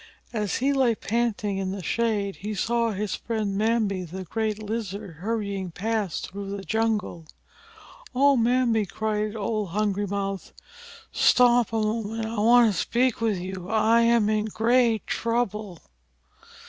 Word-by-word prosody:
As 210 -3 -1
he 275 +3 +1
lay 260 -4 +3
panting 215 -3 -1
in 190 -1 -2
the 195 -2 -6
shade 210 -2 -1
he 210 +2 -5
saw 235 +3 +1
his 205 -2 -3
friend 215 -4 -2
Mbambi, 215 -2 +1
the 185 +3 -7
great 215 +4 -2
Lizard, 210 -5 -5
hurrying 200 -1 -3
past 205 0 -3
through 200 +1 -5
the 195 - -8
jungle. 210 -4 -1 0.9
"Oh, 280 +2 +5
Mbambi!" 235 -3 +2
cried 215 +1 -2
old 215 -2 -2
Hungry 205 +1 -1
Mouth, 195 -1 -4 0.6
"stop 245 -2 +4
a - - -3
moment. 220 +1 -2
I 225 +1 -4
want 230 0 +5
to 180 - -2
speak 240 +3 +1
with 220 -4 +1
you. 185 0 -6
I 225 +1 +4
am 235 -2 +4
in 215 0 +1
great 230 0 +2
trouble." 215 -5 -2
215 Hz, 145 wpm, -25 LUFS, 200-230 Hz, 0.9 s, Oh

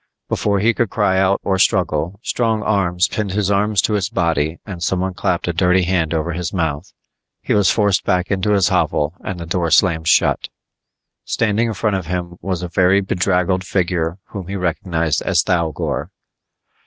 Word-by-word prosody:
Before 100 -1 0
he 115 +4 +3
could 115 -2 0
cry 95 -3 +1
out 95 +1 +2
or 95 -1 0
struggle, 90 +2 +1
strong 110 -3 0
arms 90 -4 +1
pinned 105 -4 -3
his 100 -1 0
arms 100 -1 +2
to 110 - 0
his 100 -4 0
body 80 -1 0
and 95 -5 -7
someone 95 +2 -1
clapped 90 -1 -1
a 85 - 0
dirty 90 +2 +3
hand 85 -3 0
over 80 +1 -1
his 85 0 -3
mouth. 80 -2 -2 0.5
He - - -2
was 105 -3 +4
forced 100 -3 +2
back 90 +1 0
into 100 +2 +1
his 100 -3 +3
hovel 75 +2 0
and 95 -2 -5
the 85 - -6
door 85 0 -1
slammed 80 -1 +3
shut. - - +2 0.7
Standing 110 0 0
in 115 - -2
front 105 -1 0
of 90 -4 -6
him 85 0 -4
was 90 -1 -3
a - - -2
very 90 +3 +3
bedraggled 90 -1 0
figure 85 -3 -1
whom 95 -4 -7
he 100 - -4
recognized 85 -3 -1
as - - +2
Thougor. 85 -3 -1
90 Hz, 180 wpm, -19 LUFS, 85-100 Hz, 0.7 s, was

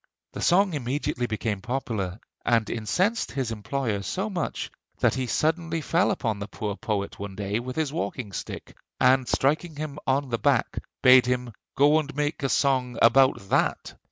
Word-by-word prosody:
The - - -6
song 190 +1 +3
immediately 130 -2 -2
became 110 -2 -2
popular, 110 -6 -3 0.2
and 115 -2 +2
incensed 185 - 0
his 130 -4 -2
employer 115 -1 -2
so 190 - -3
much 175 -4 -3 0.3
that - - +2
he 130 -1 -2
suddenly 165 +5 0
fell 170 +5 +2
upon 110 - -1
the 100 - -5
poor 105 -1 -4
poet 100 -2 -3
one 100 -1 -6
day 100 +2 -2
with 125 +1 -6
his 155 -3 -1
walking 130 -9 -3
stick, - - -7 0.2
and 130 0 +4
striking 155 +4 +1
him 150 -1 -5
on 135 +1 +1
the 115 - 0
back, - - +1 0.2
bade 130 -1 +7
him 125 -2 -1 0.2
'go 145 +3 +5
and 150 -2 -5
make 150 +1 -1
a 135 - 0
song 130 -4 +1
about 130 -4 +4
that.' - - 0
130 Hz, 170 wpm, -26 LUFS, 110-150 Hz, 0.3 s, bade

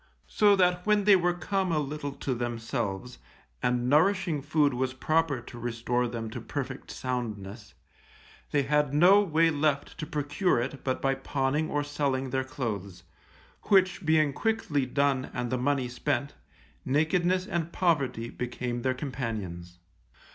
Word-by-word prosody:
So 205 -1 +4
that 180 -1 +2
when 210 0 +3
they 205 0 +7
were 175 -1 +2
come 190 0 -1
a 160 - +1
little 145 -1 -3
to 135 - -3
themselves, 120 -1 -3 0.4
and 125 0 +1
nourishing 165 +1 +3
food 145 -1 +2
was 130 +1 -2
proper 155 -2 +1
to 120 0 -11
restore 120 +1 -1
them 115 -2 -5
to - - -6
perfect 135 -2 -5
soundness, 110 -5 -5 0.7
they 145 -1 +2
had 145 0 +1
no 185 +6 +7
way 165 -3 +3
left 145 0 -1
to 155 - -4
procure 150 +2 0
it 135 +3 -4
but 130 -1 -2
by 135 0 +3
pawning 135 +3 -1
or 145 0 0
selling 140 -3 -1
their 130 0 0
clothes, 110 -9 -5 0.6
which 190 -2 +3
being 155 -3 +3
quickly 165 -10 0
done 135 0 +1
and 125 -1 -2
the 130 - +1
money 135 0 +1
spent, 130 +2 -2 0.5
nakedness 175 +6 +1
and 170 -2 -2
poverty 135 -11 0
became 120 0 -4
their 130 +1 0
companions. 105 - -5
140 Hz, 145 wpm, -28 LUFS, 125-160 Hz, 0.7 s, they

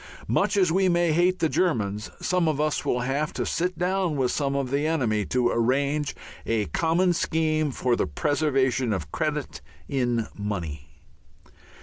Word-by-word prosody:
Much - - +1
as 185 -4 +3
we 190 +2 +3
may 175 -1 +2
hate 175 +3 +3
the 160 - +1
Germans, 110 - 0
some 180 -2 +1
of 155 -2 0
us 155 0 0
will 125 - 0
have 140 +5 -1
to - - -2
sit 180 +2 -1
down 180 -2 0
with 130 -2 +1
some 140 -2 -1
of 135 -2 -1
the 145 +2 +1
enemy 115 -10 0
to 125 -1 +1
arrange 140 +5 0 0.3
a 110 -2 0
common 170 - +1
scheme 155 -2 0
for 125 -2 0
the - - 0
preservation 130 - +1
of 80 -7 -4
credit 150 - -3 0.3
in 120 -4 0
money. 85 -8 -5
140 Hz, 160 wpm, -25 LUFS, 120-165 Hz, 0.3 s, as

